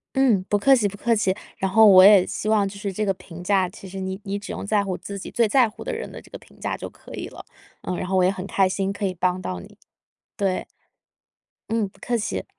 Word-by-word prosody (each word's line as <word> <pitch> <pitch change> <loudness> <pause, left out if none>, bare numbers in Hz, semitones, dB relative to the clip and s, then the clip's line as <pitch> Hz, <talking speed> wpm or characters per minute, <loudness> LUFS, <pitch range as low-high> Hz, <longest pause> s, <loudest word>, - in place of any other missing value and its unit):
嗯， 240 -9 +3
不 205 - +1
客 270 +5 +5
气 215 -5 +1
不 200 0 -4
客 230 -1 +1
气。 190 -3 +1 0.2
然 190 0 -1
后 220 +2 +7
我 185 -2 +9
也 200 -2 +7
希 215 - -4
望 205 -2 +3
就 200 - -10
是 200 -1 -4
这 215 +3 -2
个 195 - +1
评 175 -2 -11
价， 190 0 +2
其 190 - -12
实， 195 +1 -8
你 190 +1 -4
你 200 0 -3
只 205 - -7
用 - - -6
在 205 -1 +2
乎 185 -2 -3
自 200 0 -7
己 - - -8
最 230 -2 +2
在 255 +2 +4
乎 215 - -11
的 - - -5
人 470 +1 -5
的 - - -9
这 - - -19
个 - - -8
评 - - -21
价 - - -2
就 - - -7
可 - - -14
以 - - -5
了。 - - -11 0.4
嗯， 180 - -3
然 - - -4
后 190 - -1
我 185 - +4
也 185 - +4
很 190 0 -5
开 195 -1 +2
心 195 +1 -1
可 200 0 -3
以 185 - -2
帮 180 +1 0
到 90 - -4
你。 - - -15 0.6
对。 195 -2 -1 1.0
嗯， 220 -2 0
不 190 - -24
客 245 - -1
气。 210 -2 -3
195 Hz, 290 characters per minute, -23 LUFS, 185-210 Hz, 1.0 s, 我